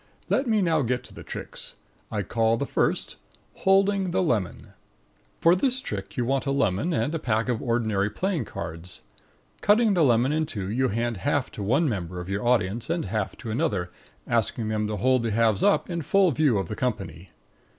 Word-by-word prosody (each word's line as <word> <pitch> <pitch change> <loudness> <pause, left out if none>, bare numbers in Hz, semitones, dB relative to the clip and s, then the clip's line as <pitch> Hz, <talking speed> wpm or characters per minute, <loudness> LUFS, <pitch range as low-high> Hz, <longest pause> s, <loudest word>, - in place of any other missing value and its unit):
Let 270 - +1
me 215 -3 +2
now 160 -3 +2
get 125 0 -1
to - - -13
the - - -10
tricks. - - -8 0.4
I - - -1
call 115 0 +1
the - - -1
first - - -1 0.4
HOLDING 195 0 +3
THE 185 - +1
LEMON 110 - -2 0.7
For 170 +2 +5
this 255 +6 +1
trick 100 - -6
you 120 - +1
want 135 +2 0
a - - +1
lemon 135 - +1
and 155 -1 0
a 165 - -1
pack 115 -4 0
of 120 -3 -1
ordinary 110 -4 0
playing 170 - -2
cards. 85 0 -7 0.6
Cutting 215 +1 +4
the 175 -4 +3
lemon 125 0 +3
in 155 0 0
two, 100 -5 -4
you 130 +4 +1
hand 115 0 -1
half 145 +5 -1
to - - -7
one 135 +11 +2
member 90 - -3
of 90 +1 -7
your 100 +3 -2
audience 115 -1 +1
and 165 -1 -1
half 110 -3 -3
to 115 -5 -6
another, 105 - -1 0.3
asking 115 -1 0
them 105 -1 0
to 105 0 -3
hold 130 +4 +3
the 115 - -1
halves 110 -2 +2
up 205 - +3
in 170 -2 -3
full 185 +4 +3
view 140 -4 +2
of 95 -3 -2
the 105 - -4
company. 95 - -3
120 Hz, 200 wpm, -26 LUFS, 105-160 Hz, 0.7 s, For